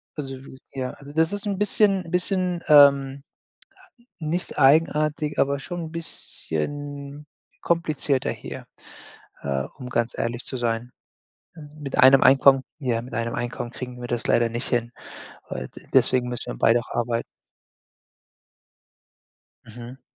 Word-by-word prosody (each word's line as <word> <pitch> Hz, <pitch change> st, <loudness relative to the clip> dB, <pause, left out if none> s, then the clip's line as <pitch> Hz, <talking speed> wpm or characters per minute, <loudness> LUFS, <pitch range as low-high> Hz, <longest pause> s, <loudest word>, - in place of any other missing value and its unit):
Also, 135 Hz, -3 st, -5 dB, 0.4 s
ja 130 Hz, -2 st, -3 dB
also, 140 Hz, 0 st, -13 dB
das 160 Hz, +1 st, +2 dB
ist 205 Hz, +1 st, -3 dB
'n 200 Hz, -2 st, -2 dB
bisschen 200 Hz, -3 st, +2 dB
bisschen, 180 Hz, -1 st, 0 dB
ähm, 140 Hz, -2 st, +6 dB, 1.0 s
nicht 165 Hz, +3 st, -3 dB
eigenartig, 150 Hz, +1 st, +3 dB
aber 140 Hz, 0 st, +2 dB
schon 175 Hz, +5 st, -6 dB
'n 160 Hz, -, -9 dB
bisschen 145 Hz, -, -5 dB, 0.3 s
komplizierter 155 Hz, -5 st, 0 dB
hier, -, -, -8 dB, 0.8 s
äh, 70 Hz, -1 st, -1 dB
um 125 Hz, -, -8 dB
ganz 120 Hz, -1 st, -1 dB
ehrlich 120 Hz, +1 st, -2 dB
zu 130 Hz, -, -5 dB
sein. 120 Hz, +1 st, -2 dB, 0.8 s
Mit 145 Hz, -3 st, -6 dB
einem 130 Hz, 0 st, +8 dB
Einkommen 135 Hz, 0 st, +6 dB, 0.2 s
ja, 120 Hz, -5 st, -1 dB
mit 125 Hz, -, -11 dB
einem 115 Hz, +1 st, -2 dB
Einkommen 120 Hz, 0 st, -4 dB
kriegen 125 Hz, 0 st, -7 dB
wir 120 Hz, -, -5 dB
das 120 Hz, -1 st, -2 dB
leider 120 Hz, 0 st, +3 dB
nicht 120 Hz, +2 st, -4 dB
hin, 120 Hz, -1 st, 0 dB, 0.6 s
weil 65 Hz, -1 st, -5 dB
d -, -, -15 dB
deswegen 125 Hz, -1 st, +3 dB
müssen 120 Hz, -, -5 dB
wir -, -, -10 dB
beide 115 Hz, +1 st, +4 dB
auch -, -, -14 dB
arbeiten. 115 Hz, 0 st, -1 dB, 2.4 s
Mhm. 120 Hz, +3 st, -10 dB
135 Hz, 135 wpm, -24 LUFS, 120-155 Hz, 2.4 s, einem